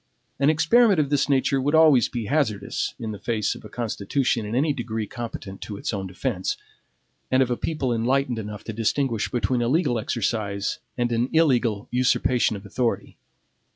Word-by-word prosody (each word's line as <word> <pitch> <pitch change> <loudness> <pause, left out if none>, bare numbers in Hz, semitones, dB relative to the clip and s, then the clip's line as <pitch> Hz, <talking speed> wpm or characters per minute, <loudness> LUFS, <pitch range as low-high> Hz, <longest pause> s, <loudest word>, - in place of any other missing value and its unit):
An 140 +1 +4
experiment 195 +6 +4
of 145 -2 0
this 145 0 +2
nature 135 0 +2
would 145 +4 +1
always 155 -6 +6
be 120 -3 -4
hazardous 110 -8 -1
in 110 -3 -4
the 105 - -7
face 110 -3 -1
of - - -12
a 105 - -10
constitution 115 +1 -1
in 110 - -3
any 145 +3 +2
degree 115 -4 -3
competent 110 -4 -7
to 105 - -6
its - - -3
own 95 -2 -3
defense, 95 +1 -2 0.7
and 130 +1 +4
of 125 - -3
a - - +2
people 135 -3 -2
enlightened 125 +1 0
enough 105 -1 -7
to 110 - -6
distinguish 115 +1 0
between 125 0 0
a 120 - +1
legal 130 -4 +2
exercise 105 -3 -2 0.2
and 120 -1 0
an 120 +2 +1
illegal 125 -10 +2
usurpation 125 -2 +2
of 100 0 -9
authority. 115 +4 -2
120 Hz, 180 wpm, -24 LUFS, 110-135 Hz, 0.7 s, always